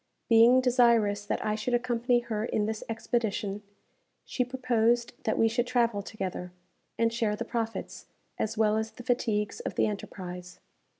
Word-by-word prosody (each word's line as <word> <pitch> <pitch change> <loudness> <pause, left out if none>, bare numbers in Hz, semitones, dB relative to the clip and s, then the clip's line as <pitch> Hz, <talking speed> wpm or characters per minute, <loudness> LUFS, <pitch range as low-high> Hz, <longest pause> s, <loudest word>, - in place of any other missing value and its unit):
Being 235 +3 +7
desirous 235 -5 +3
that - - -2
I 215 - +1
should 220 +3 -1
accompany 240 0 +1
her 220 -3 -3
in 215 -2 0
this 220 0 -3
expedition, 220 -3 -2 0.6
she 250 - -1
proposed 240 -2 +1
that 220 - +1
we 225 - +4
should 240 +2 0
travel 235 -4 +1
together, 190 -3 -5 0.5
and 230 0 +2
share 225 -3 0
the - - -4
profits, 225 -1 -4 0.3
as 220 +1 -2
well 215 -1 +3
as 220 0 -1
the 245 - -12
fatigues 220 -4 0
of - - -5
the - - +3
enterprise. 180 -3 -6
225 Hz, 160 wpm, -28 LUFS, 210-240 Hz, 0.6 s, Being